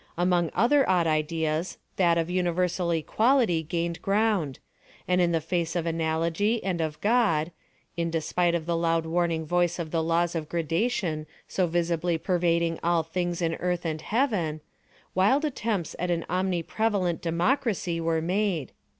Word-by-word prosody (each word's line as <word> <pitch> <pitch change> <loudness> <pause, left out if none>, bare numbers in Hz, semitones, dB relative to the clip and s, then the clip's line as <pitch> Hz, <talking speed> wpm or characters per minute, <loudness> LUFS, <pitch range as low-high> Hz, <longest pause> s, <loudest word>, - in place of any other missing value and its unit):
Among 175 -1 +2
other 265 +6 +3
odd 180 -3 +3
ideas, 160 +1 -1 0.2
that 170 -3 +3
of 165 -1 0
universal 180 0 0
equality 205 - +2
gained 170 +1 -3
ground; 200 -8 +1 0.5
and 180 0 +3
in 175 -1 +3
the 165 - +2
face 170 +1 -2
of 170 -2 -1
analogy 165 +6 0
and 180 -3 -1
of 155 -2 -3
God—in 170 -5 -1
despite 170 +2 0
of 165 -2 -2
the 170 0 0
loud 165 -1 +1
warning 165 -1 0
voice 175 +1 +1
of 165 -3 -5
the 165 - +1
laws 170 +1 +1
of 160 -3 -4
gradation 165 -1 -1 0.2
so 185 -2 0
visibly 170 0 0
pervading 170 -1 +1
all 170 -1 +2
things 175 +1 -2
in 165 0 +1
Earth 180 -1 -2
and 155 -1 -2
Heaven—wild 200 - -1
attempts 220 - -2
at 180 +1 -1
an 170 -1 0
omni 180 -1 0
prevalent 200 -5 0
Democracy 175 - 0
were 165 -1 0
made. 180 - 0
170 Hz, 150 wpm, -27 LUFS, 165-185 Hz, 0.5 s, other